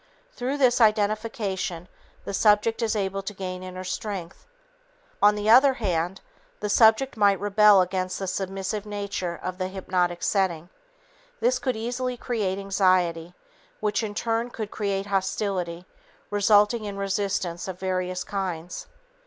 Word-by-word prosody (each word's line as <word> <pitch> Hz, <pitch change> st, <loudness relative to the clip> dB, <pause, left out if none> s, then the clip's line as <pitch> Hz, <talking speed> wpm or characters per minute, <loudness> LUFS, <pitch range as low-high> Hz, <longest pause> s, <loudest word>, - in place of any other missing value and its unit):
Through 260 Hz, +3 st, -2 dB
this 250 Hz, -2 st, +3 dB
identification, 210 Hz, -4 st, 0 dB, 0.4 s
the 200 Hz, -, -5 dB
subject 210 Hz, +2 st, +3 dB
is 225 Hz, -1 st, 0 dB
able 195 Hz, -1 st, -1 dB
to 195 Hz, +1 st, -7 dB
gain 185 Hz, -1 st, -5 dB
inner 185 Hz, 0 st, -7 dB
strength. 185 Hz, -, -5 dB, 0.7 s
On 210 Hz, 0 st, +6 dB
the 210 Hz, 0 st, -3 dB
other 260 Hz, +4 st, +7 dB
hand, 180 Hz, -4 st, -2 dB, 0.4 s
the 210 Hz, -, -3 dB
subject 225 Hz, +4 st, +4 dB
might 200 Hz, -2 st, +4 dB
rebel 205 Hz, -1 st, +5 dB
against 185 Hz, 0 st, -2 dB
the 195 Hz, -, -4 dB
submissive 195 Hz, +2 st, -3 dB
nature 200 Hz, -4 st, -4 dB
of 185 Hz, 0 st, -4 dB
the 185 Hz, -, -1 dB
hypnotic 180 Hz, -2 st, -1 dB
setting. 175 Hz, -4 st, 0 dB, 0.7 s
This -, -, +2 dB
could 255 Hz, -3 st, -1 dB
easily 245 Hz, +3 st, -3 dB
create 210 Hz, -7 st, -2 dB
anxiety 185 Hz, -4 st, +1 dB, 0.4 s
which, 210 Hz, 0 st, 0 dB
in 210 Hz, -2 st, -4 dB
turn, 230 Hz, +2 st, -1 dB
could 215 Hz, -3 st, -6 dB
create 200 Hz, -2 st, -2 dB
hostility 190 Hz, -3 st, -2 dB, 0.5 s
resulting 210 Hz, +2 st, +3 dB
in 200 Hz, -1 st, -5 dB
resistance 195 Hz, -3 st, -2 dB
of 185 Hz, -1 st, -6 dB
various 185 Hz, -1 st, -2 dB
kinds. 180 Hz, -4 st, -4 dB
200 Hz, 135 wpm, -25 LUFS, 185-215 Hz, 0.7 s, other